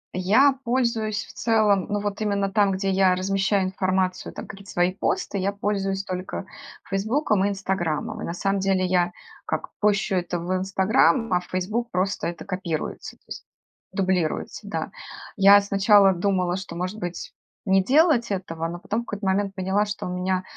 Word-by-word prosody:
Я 220 +10 +4
пользуюсь 235 -3 0
в - - -14
целом, 215 -4 +2
ну, 205 0 0
вот 205 +1 -4
именно 200 -2 0
там, 200 -1 +3
где 195 +1 -1
я 190 -1 +4
размещаю 195 +1 +1
информацию, 185 0 -1
там - - -8
какие-то 195 +1 -11
свои 175 +1 +1
посты, 200 0 -1
я 195 +2 0
пользуюсь 195 -1 -2
только 185 0 -5 0.4
"Фейсбуком" 210 +2 +1
и - - +2
"Инстаграмом". 190 +2 -2
И - - -4
на 170 - -4
самом 195 +2 0
деле 190 -1 +1
я 180 -1 +2 0.4
как - - -3
пощу 205 -1 +2
это 175 -1 -1
в 175 +2 -3
"Инстаграм", 195 +4 +2
а 180 - +4
в 180 - -12
"Фейсбук" 210 +6 -2
просто 185 -2 -1
это 170 +2 -6
копируется, 185 -5 -4
то - - -40
есть - - -8 0.5
дублируется. 185 -5 -1
Да, - - -3 0.4
я 200 0 +8
сначала 200 0 +5
думала, 180 -1 0
что, 190 -3 -7
может 185 +5 -4
быть, 175 -3 -6 0.3
не 190 0 +4
делать 270 - +3
этого. 165 -4 -3
Но 170 +1 -5
потом 210 +5 -3
в - - -11
какой-то 205 -2 -5
момент 195 +1 0
поняла, 190 +2 +1
что 205 0 -5
у - - -4
меня 185 +1 -1
195 Hz, 175 wpm, -24 LUFS, 185-205 Hz, 0.5 s, я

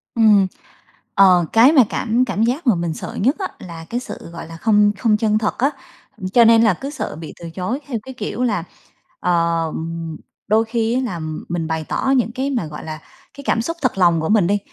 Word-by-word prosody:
Ừm. 210 -4 +5 0.7
Ờ, 180 -3 +6
cái 235 +6 +7
mà 275 -6 +6
cảm 240 +2 0
cảm 225 -2 -1
giác 255 +5 -1
mà 225 - +5
mình 170 -2 -2
sợ - - -7
nhất 265 +8 +3
á, 380 - -1
là 165 -2 -9
cái 240 - -2
sự, 250 - -9
gọi 170 - -8
là, 165 0 -10
không 210 +1 +3
không 215 0 +2
chân 215 -1 +1
thật 210 -1 -1
á. 270 +3 +2 0.5
Ừm, 185 - -5
cho 235 +4 +5
nên 230 0 +6
là 220 -4 +4
cứ 275 +11 -6
sợ 290 - -5
bị 160 0 -9
từ 170 -1 -7
chối 190 - -3
theo 245 - -2
cái 265 - -9
kiểu 250 0 -4
là, 205 -8 0 0.6
ờm, 165 -1 -1 0.3
đôi 220 +2 +3
khi 225 0 -1
á 255 - +1
làm 160 -7 -5
mình 170 -1 -2
bày 160 -1 -2
tỏ 265 - -1
những 235 -2 +1
cái 265 +2 -2
mà, 240 - -1
gọi 150 0 -8
là, 155 -1 -6 0.4
cái 280 - -10
cảm 230 - +1
xúc 330 +7 -4
thật 255 -6 0
lòng 170 -3 +4
của 160 - -2
mình 210 -5 +3
đi, 205 +2 +2
210 Hz, 230 wpm, -20 LUFS, 170-240 Hz, 0.7 s, cái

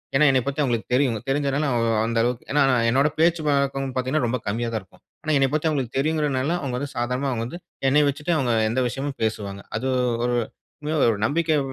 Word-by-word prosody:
ஏனா 150 +2 +5
என்னைய 130 -2 +2
பத்தி 140 +2 -1
அவங்களுக்கு 120 -4 -1
தெரியும். 125 -3 +2
தெரிஞ்சதுனால 140 +1 0
அவ் 115 -1 +1 0.2
அந்த 115 0 -1
அளவுக்கு 120 0 -2
ஏனா, 145 -1 +4 0.3
என்னோட 135 +5 +3
பேச்சு 165 0 +3
வழக்கம் 140 -1 +1
பார்த்தீங்கன்னா, 130 +2 0
ரொம்ப 125 +2 -1
கம்மியா 115 +3 -1
தான் 110 - -1
இருக்கும். 90 - -24 0.2
ஆனா, 155 - -1
என்னைய 135 -1 +2
பத்தி 155 +1 +1
அவங்களுக்கு 135 -4 -2
தெரியுங்கிறனால 150 -2 0
அவங்க 130 -3 -3
வந்து 140 0 -5
சாதாரணமா 125 +3 -1
அவங்க 115 -1 -2
வந்து 170 +8 -8 0.3
என்னைய 145 +2 +4
வச்சுட்டு 150 +5 -2
அவங்க 125 -4 +1 0.2
எந்த 130 +3 0
விஷயமும் 135 +3 -4
பேசுவாங்க. 100 -3 -3
அது 130 +4 -2 0.4
ஒரு 120 0 +1 0.4
உண்மையா 155 +1 -2
ஒரு 105 - -2
நம்பிக்கை 160 +2 +1
135 Hz, 200 wpm, -23 LUFS, 120-145 Hz, 0.4 s, ஏனா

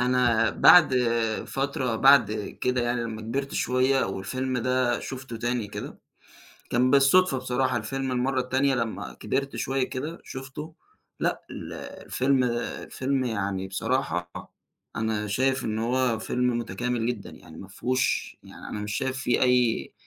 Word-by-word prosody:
أنا 125 -2 +3
بعد 165 -7 +7 0.5
فترة 135 -3 -1
بعد 135 -4 +6 0.3
كده 125 0 +1
يعني 120 0 0
لمّا 110 -2 -5
كبرت 135 +5 -3
شوية 130 +2 +2
والفيلم 125 +7 -3
ده 125 0 +1
شُفته 130 -3 -7
تاني 120 -1 -2
كده، - - -7 0.7
كان 125 +1 +3
بالصدفة 140 +3 +5
بصراحة 130 0 0
الفيلم 130 +4 -3
المرّة 130 +1 0
التانية 130 +2 +1
لمّا 110 - -3
كبرت 140 - -2
شوية 135 0 -1
كده 150 +6 -5
شُفته 135 +4 -8 0.5
لأ - - 0
ال - - -7
الفيلم 130 0 -1
الفيلم 130 +2 -2
يعني 100 -5 -2
بصراحة 95 -4 -1 0.7
أنا 110 -1 -1
شايف 130 +6 +1
إن 110 0 -2
هو 120 0 +1
فيلم 125 +1 0
متكامل 120 +2 -2
جدًا، 120 -5 -3
يعني 80 - -14
ما 95 - -10
فيهوش 125 +6 -1
يعني - - -11
أنا 105 - -5
مش 105 +1 -4
شايف 130 0 -2
في 120 -1 +1
أي 125 - +2
125 Hz, 140 wpm, -26 LUFS, 115-130 Hz, 0.7 s, بعد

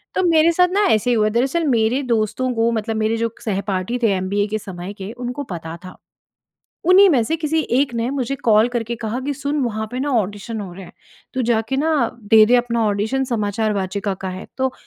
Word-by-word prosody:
तो 375 - +1
मेरे 330 -1 +4
साथ 360 +2 +4
ना 405 +2 +2
ऐसे 220 - +2
ही - - +3
हुआ 215 -1 +2
दरअसल 265 +9 0
मेरे 235 +1 +2
दोस्तों 230 +4 0
को 230 +1 +2
मतलब 225 0 -2
मेरे 220 +1 0
जो 230 0 -2
सहपाठी 200 +1 -2
थे 220 - +4
एमबीए 200 +2 0
के 215 +1 -2
समय 185 0 -7
के 200 +1 -7
उनको 245 +3 -5
पता 165 -1 -6
था। 185 - -11 0.9
उन्हीं 390 +2 +8
में 260 -7 +3
से 320 +8 -1
किसी 320 0 -1 0.2
एक 275 -2 +1
ने 230 +1 -1
मुझे 275 -1 -2
कॉल 220 -1 +3
करके 235 -1 -3
कहा 225 +2 -3
कि, 280 +2 -2
"सुन 285 +2 -2
वहाँ 220 -2 -2
पे 250 - -4
ना 285 +2 -1
ऑडिशन 210 +2 -4
हो 190 -3 -7
रहे 190 +2 -10
हैं। - - -14 0.4
तू 260 - 0
जाके 225 +3 +1
ना 310 +4 +1 0.3
दे 215 +1 +6
दे 245 +3 +5
अपना 235 -2 0
ऑडिशन 220 +6 0
समाचार 215 -2 -1
वाचिका 195 0 -2
का 190 - -4
है।" 185 +1 -7
तो 260 0 0
230 Hz, 220 wpm, -20 LUFS, 205-260 Hz, 0.9 s, उन्हीं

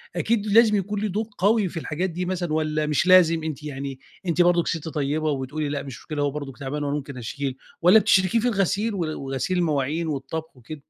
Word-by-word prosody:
أكيد 220 -2 0
لازم 215 0 +5
يكون 205 +1 -1
ليه 215 - 0
دور 210 +3 -2
قوي 205 +1 +3
في - - -8
الحاجات 175 +5 -2
دي 180 +2 -3
مثلًا، 175 -3 -2
والّا 155 -1 0
مش 150 +4 +1
لازم؟ 165 -3 +6
أنتِ 155 -1 -5
يعني 135 -2 -5 0.3
أنتِ 175 0 +2
برضه 175 -1 +4
ست 160 -1 -3
طيبة 150 +1 -1
وتقولي 145 +2 -3
لأ 145 -1 -3
مش 135 -4 -8
مشكلة، 150 -2 -4
هو 140 - +1
برضه 145 -2 -5
تعبان 145 +2 -4
وأنا 145 0 -1
ممكن 140 -2 -6
أشيل؟ 130 +3 -4 0.2
والّا 185 +6 +7
بتشركِيه 190 +2 +3
في 245 - 0
الغسيل 205 +1 0
و - - -4 0.3
وغسيل 135 +7 -1
المواعين 155 0 0
والطبخ 155 0 -5
وكده؟ 125 +6 -8
160 Hz, 210 wpm, -24 LUFS, 145-185 Hz, 0.3 s, والّا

